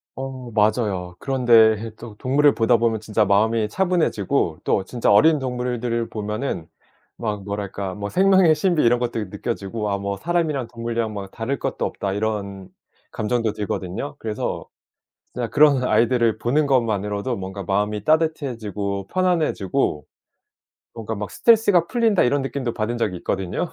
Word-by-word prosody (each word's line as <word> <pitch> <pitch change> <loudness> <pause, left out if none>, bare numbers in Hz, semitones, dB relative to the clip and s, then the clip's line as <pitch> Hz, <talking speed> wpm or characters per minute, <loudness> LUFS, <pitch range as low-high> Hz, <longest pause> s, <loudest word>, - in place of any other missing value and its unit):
어 130 -2 -7
맞아요. 105 -5 0
그런데 115 -4 +3
또 115 -2 -11
동물을 145 +3 +3
보다 115 +1 +3
보면 115 -1 +1
진짜 110 0 0
마음이 105 +2 +2
차분해지고 155 - 0
또 95 - +1
진짜 120 -2 0
어린 155 +9 +5
동물들을 125 -2 -2
보면은 105 - -4 0.5
막 105 -4 -3
뭐랄까 100 -1 -4
뭐 100 0 -5
생명의 190 -3 +5
신비 165 +1 +1
이런 120 +1 +4
것들이 115 -5 -3
느껴지고 105 0 -4
아 100 - 0
뭐 100 0 -3
'사람이랑 160 -7 -1
동물이랑 115 -2 -3
막 100 -1 -6
다를 125 +5 -3
것도 - - -2
없다.' 100 -1 -3
이런 100 -3 -3 0.4
감정도 110 0 -1
들거든요. 105 +5 -4
그래서 110 -2 -4 0.7
그냥 120 -2 -3
그런 140 -1 +4
아이들을 115 -2 +2
보는 140 +6 +1
것 130 -3 +4
만으로도 105 +2 -2
뭔가 95 0 -6
마음이 105 +2 -1
따뜻해지고 115 - -1
편안해지고 150 - 0 0.9
뭔가 110 -1 -5
막 105 0 -5
'스트레스가 205 -7 +4
풀린다.' 230 -6 +2
이런 140 +2 +2
느낌도 130 -3 -3
받은 110 +2 -2
적이 105 -6 -1
있거든요. 95 - -3
115 Hz, 350 characters per minute, -22 LUFS, 105-135 Hz, 0.9 s, 어린